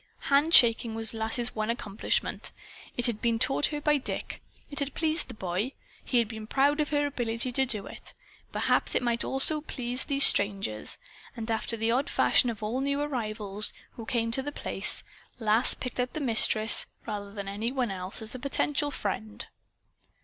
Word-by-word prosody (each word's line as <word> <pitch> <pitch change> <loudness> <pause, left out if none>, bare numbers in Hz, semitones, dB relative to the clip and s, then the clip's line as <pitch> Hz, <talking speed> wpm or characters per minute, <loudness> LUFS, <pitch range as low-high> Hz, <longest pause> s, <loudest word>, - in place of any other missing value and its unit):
Handshaking 245 -6 +5
was 225 0 0
Lass's 225 +2 -1
one 215 0 -2
accomplishment. 215 -3 -2 0.5
It 245 - +6
had 235 -4 +3
been 230 -1 +1
taught 270 +4 +3
her 295 - -4
by 295 0 +2
Dick. - - -3 0.3
It 285 - -2
had 280 -1 -3
pleased 320 0 +1
the - - -9
boy. 190 +7 -3 0.3
He 250 - 0
had 235 -2 +3
been 220 -1 -8
proud 285 +5 +2
of 300 - -2
her 290 -1 +1
ability 240 -3 -2
to 265 +2 +1
do 210 -5 -1
it. - - -8 0.4
Perhaps - - +1
it - - +2
might 235 -1 +1
also 300 +3 +3
please 250 -4 -4
these 280 -1 +3
strangers. 195 - +2 0.4
And 225 0 -4
after 225 +1 -1
the 225 +1 0
odd 260 +4 0
fashion 245 - +3
of 220 -2 -6
all 235 +5 -2
new 280 +1 0
arrivals 215 -7 -2 0.2
who 230 - -9
came 230 -2 0
to 265 - +3
The 290 +2 -5
Place, - - -3 0.3
Lass 225 +1 +2
picked 250 0 -3
out 250 0 -1
the - - -3
Mistress, 225 -4 +4 0.2
rather 205 -2 -5
than 200 -1 -7
any 210 +4 -2
one 255 -5 -1
else, 185 +3 -2
as 220 - 0
a 255 - -4
potential 290 +2 0
friend. 215 -4 -4
235 Hz, 185 wpm, -28 LUFS, 215-275 Hz, 0.5 s, It